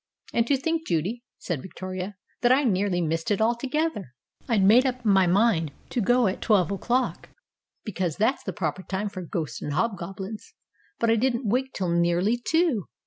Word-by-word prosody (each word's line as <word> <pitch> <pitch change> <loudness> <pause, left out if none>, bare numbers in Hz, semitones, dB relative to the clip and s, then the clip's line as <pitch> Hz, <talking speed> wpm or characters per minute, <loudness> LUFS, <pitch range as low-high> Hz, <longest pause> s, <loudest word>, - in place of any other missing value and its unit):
"And 235 0 +2
to 280 - +3
think, 325 +4 -2
Judy," 180 +9 -1 0.2
said 170 -7 -4
Victoria, 185 +3 -6 0.3
"that 245 - +4
I 270 +3 +4
nearly 195 -5 +1
missed 165 0 -1
it 205 - +1
altogether. 240 - -1 0.3
I'd 215 -5 +3
made 220 +6 +7
up 255 -2 -2
my 195 -3 +4
mind 180 -5 +2 0.2
to 245 - 0
go 245 +4 +3
at 190 -1 -1
twelve 200 -5 +3
o'clock, 245 +6 -1 0.6
because 185 -7 -2
that's 225 +6 +1
the - - -4
proper 185 -2 -3
time 195 +2 -3
for 185 -2 -7
ghosts 160 -6 -4
and 145 - -3
hobgoblins. 195 +2 -4 0.4
But 230 -1 +2
I 230 - +3
didn't 240 0 0
wake 260 +5 0
till 185 -3 -1
nearly 175 +7 +2
two. 320 - +1
205 Hz, 175 wpm, -26 LUFS, 180-245 Hz, 0.6 s, made